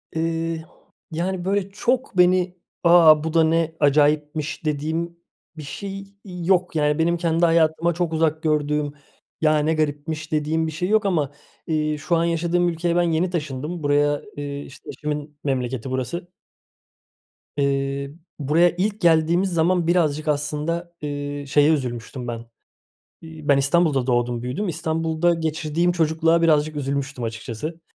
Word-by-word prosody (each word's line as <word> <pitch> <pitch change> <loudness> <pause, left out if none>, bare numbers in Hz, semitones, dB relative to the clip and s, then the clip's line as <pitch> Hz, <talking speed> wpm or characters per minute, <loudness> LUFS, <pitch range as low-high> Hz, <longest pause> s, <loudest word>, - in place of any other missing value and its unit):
Eee, 165 0 -2 0.5
yani, 180 +2 -2
böyle, 200 0 0
çok 245 0 -1
beni, 180 0 +3 0.3
"A! 165 -3 +7
Bu 160 0 -3
da 165 -1 +5
ne 165 0 +1
acayipmiş!" 150 +1 +1
dediğim 160 +3 -2 0.4
bir 155 - -7
şey 195 +8 -6 0.2
yok. 180 -1 0
Yani, 150 0 +1
benim 170 +1 +2
kendi 170 0 +2
hayatıma 165 0 +2
çok 170 -1 -2
uzak 160 0 0
gördüğüm, 150 -1 0 0.5
"Ya, 155 -1 +4
ne 155 +2 +1
garipmiş!" 155 +1 -2
dediğim 155 +1 0
bir - - -3
şey 175 +4 -3
yok 215 -1 +3
ama, 155 -7 +1 0.4
eee, 155 -1 0
şu 170 +4 0
an 165 - +2
yaşadığım 170 +1 +1
ülkeye 170 +1 -1
ben 175 - +3
yeni 170 +1 +1
taşındım. 155 0 -4
Buraya, 145 0 +2 0.2
eee, 145 0 -5
işte, 135 - -13
eşimin 150 -1 -5
memleketi 130 -2 -2
burası. 130 +8 -3 1.3
Eee, 140 0 -1 0.3
buraya 155 +5 +4
ilk 205 +3 -1
geldiğimiz 170 +3 +3
zaman 170 +1 +2
birazcık 155 -3 +1
aslında, 150 +4 -2
eee, 145 -1 -4
şeye 145 +2 +4
üzülmüştüm 125 -2 -4
ben: 115 -1 -5 0.8
İi, 160 -2 -10
ben 140 -1 +5
İstanbul'da 140 -2 +2
doğdum, 120 -1 0
büyüdüm; 180 +11 -3
İstanbul'da 165 +1 0
geçirdiğim 160 +1 0
çocukluğa 165 0 +2
birazcık 155 -1 +2
üzülmüştüm 140 -3 -3
açıkçası. 115 +8 -5
160 Hz, 140 wpm, -22 LUFS, 145-170 Hz, 1.3 s, A